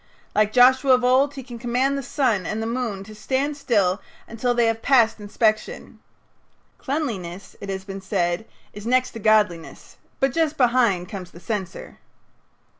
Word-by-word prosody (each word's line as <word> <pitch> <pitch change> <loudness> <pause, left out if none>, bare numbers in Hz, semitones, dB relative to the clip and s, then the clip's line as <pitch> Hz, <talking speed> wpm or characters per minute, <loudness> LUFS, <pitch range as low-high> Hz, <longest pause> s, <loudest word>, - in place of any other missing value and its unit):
Like 215 0 +2
Joshua 260 +3 +5
of 250 0 +3
old, 265 +3 +3
he 265 - -7
can 240 -2 -9
command 250 +3 0
the 275 - -2
sun 240 -7 0
and 215 - -3
the 225 - -2
moon 230 -4 -3
to 215 +2 -12
stand 265 +7 -2
still 210 -9 +1 0.3
until 240 +2 -1
they 240 -1 +3
have 225 0 0
passed 235 -5 +3
inspection. 215 +1 -1 0.8
Cleanliness, 200 - -4
it 200 - -7
has 190 -1 -4
been 195 0 -7
said, 190 0 -1 0.3
is 210 +2 -8
next 255 +1 +2
to 230 - -8
godliness, 210 -6 0 0.2
but 270 -2 +1
just 320 -1 0
behind 235 -8 +2
comes 185 -3 -7
the 170 - -14
censor. 190 0 -5
225 Hz, 165 wpm, -23 LUFS, 200-255 Hz, 0.8 s, Joshua